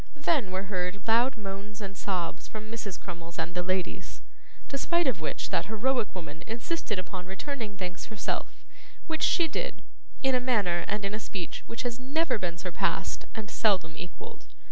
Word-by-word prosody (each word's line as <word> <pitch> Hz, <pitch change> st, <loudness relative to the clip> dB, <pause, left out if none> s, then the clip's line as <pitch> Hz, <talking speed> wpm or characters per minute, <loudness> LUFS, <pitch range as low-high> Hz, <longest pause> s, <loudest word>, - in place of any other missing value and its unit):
Then 290 Hz, -, +3 dB
were 185 Hz, +1 st, 0 dB
heard 190 Hz, +1 st, -1 dB
loud 235 Hz, +3 st, +5 dB
moans 200 Hz, 0 st, -5 dB
and 195 Hz, -2 st, -4 dB
sobs 185 Hz, -4 st, -1 dB
from 215 Hz, 0 st, -6 dB
Mrs. 210 Hz, -5 st, -3 dB
Crummles 170 Hz, 0 st, -7 dB
and 175 Hz, +1 st, -1 dB
the 180 Hz, -, +1 dB
ladies, 185 Hz, 0 st, -1 dB, 0.5 s
despite 340 Hz, +5 st, +3 dB
of 235 Hz, -, +2 dB
which 155 Hz, -, -1 dB
that -, -, +2 dB
heroic 230 Hz, +1 st, +2 dB
woman 160 Hz, -4 st, -6 dB
insisted 230 Hz, -, -1 dB
upon 185 Hz, 0 st, -4 dB
returning 210 Hz, +1 st, -3 dB
thanks 185 Hz, 0 st, -3 dB
herself, 220 Hz, -, -2 dB, 0.4 s
which 320 Hz, -1 st, -1 dB
she 340 Hz, -2 st, +5 dB
did, -, -, -2 dB, 0.4 s
in 265 Hz, 0 st, +5 dB
a 255 Hz, -, +5 dB
manner 205 Hz, -9 st, +3 dB
and 205 Hz, 0 st, 0 dB
in 195 Hz, -, 0 dB
a 215 Hz, -, 0 dB
speech 190 Hz, -5 st, -4 dB
which 230 Hz, -, -3 dB
has 245 Hz, -1 st, -1 dB
never 280 Hz, 0 st, +2 dB
been 175 Hz, -2 st, -1 dB
surpassed 180 Hz, -1 st, 0 dB
and 220 Hz, 0 st, -4 dB
seldom 195 Hz, -7 st, +3 dB
equalled. 175 Hz, +1 st, -8 dB
205 Hz, 170 wpm, -30 LUFS, 185-240 Hz, 0.5 s, loud